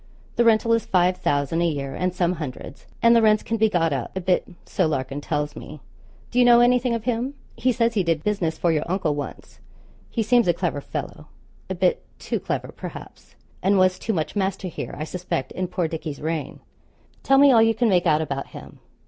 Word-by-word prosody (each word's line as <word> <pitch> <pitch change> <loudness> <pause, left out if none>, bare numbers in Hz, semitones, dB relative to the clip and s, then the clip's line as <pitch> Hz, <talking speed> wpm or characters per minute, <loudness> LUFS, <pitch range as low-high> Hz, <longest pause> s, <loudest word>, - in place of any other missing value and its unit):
The 235 - +3
rental 230 0 +4
is 230 -2 +2
five 180 0 +2
thousand 145 +3 0
a 170 - +3
year 140 -4 -3
and 185 0 -1
some 180 -1 0
hundreds, 135 -1 -8 0.2
and 235 0 +6
the 230 - +5
rents 215 -1 +4
can 225 - -2
be 220 0 +3
got 165 -5 +1
up 135 +7 -4
a - - -2
bit 180 0 +1 0.2
so 185 -5 0
Larkin 135 -1 -3
tells 150 -1 -2
me. 150 - -9 0.5
Do 245 - +1
you - - +7
know 240 -1 +7
anything 245 0 +3
of 230 - -4
him? 250 +3 -2 0.2
He 255 - +1
says 235 -1 +1
he 210 - +2
did 165 -2 0
business 175 -6 -1
for 170 - +1
your 155 -2 +1
uncle 170 -4 0
once. 145 -1 -7 0.5
He 230 - -1
seems 235 0 +3
a 175 - +4
clever 170 -5 -2
fellow - - -6 0.4
a - - -2
bit - - +1
too - - -3
clever, - - -3
perhaps - - -10 0.3
and 195 +2 +3
was 185 -1 +3
too 225 - -2
much 165 -3 -2
master 190 -1 -1
here, - - -6
I 150 - -3
suspect, 175 -5 -4
in 185 0 -3
poor 175 -1 -1
Dickie's 155 -3 -6
reign. 155 -2 -4 0.6
Tell 270 - +3
me 280 0 +7
all 230 -3 +6
you 225 0 +3
can 240 +2 +2
make 180 -4 +2
out 155 -1 +3
about 140 -3 -4
him. - - -12
180 Hz, 215 wpm, -23 LUFS, 155-225 Hz, 0.6 s, you